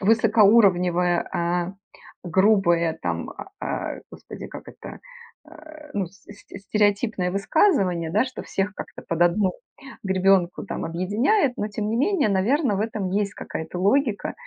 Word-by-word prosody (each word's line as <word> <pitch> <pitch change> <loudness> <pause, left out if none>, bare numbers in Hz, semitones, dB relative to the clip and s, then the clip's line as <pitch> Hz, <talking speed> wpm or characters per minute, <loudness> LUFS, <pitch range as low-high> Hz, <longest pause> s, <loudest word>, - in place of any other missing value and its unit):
высокоуровневое, 195 -5 +4
а, 175 +2 -1 0.5
грубое, 175 -3 +2
там, - - -3
а, 390 - -10
а, - - -4
Господи, - - -10
как - - -10
это, - - -10 0.5
а, 310 -1 -14
ну, 195 -3 -1
с 190 +3 -19
c 205 0 -13
стереотипное 205 -1 0
высказывание, 195 - +1
да, 255 - +2
что 255 - -7
всех 200 +2 -2
как-то - - -9
под 170 0 -3
одну 185 +2 +2 0.5
гребенку 190 -2 +2
там - - -4
объединяет. 225 - +1
Но, 210 - -2
тем 210 0 -3
не 225 - 0
менее, 305 - +2
наверно, 215 - +1
в - - -2
этом 210 -4 -2
есть 200 0 -1
какая-то 160 +2 -6
логика, 225 +2 +1
200 Hz, 140 wpm, -24 LUFS, 180-225 Hz, 0.5 s, высокоуровневое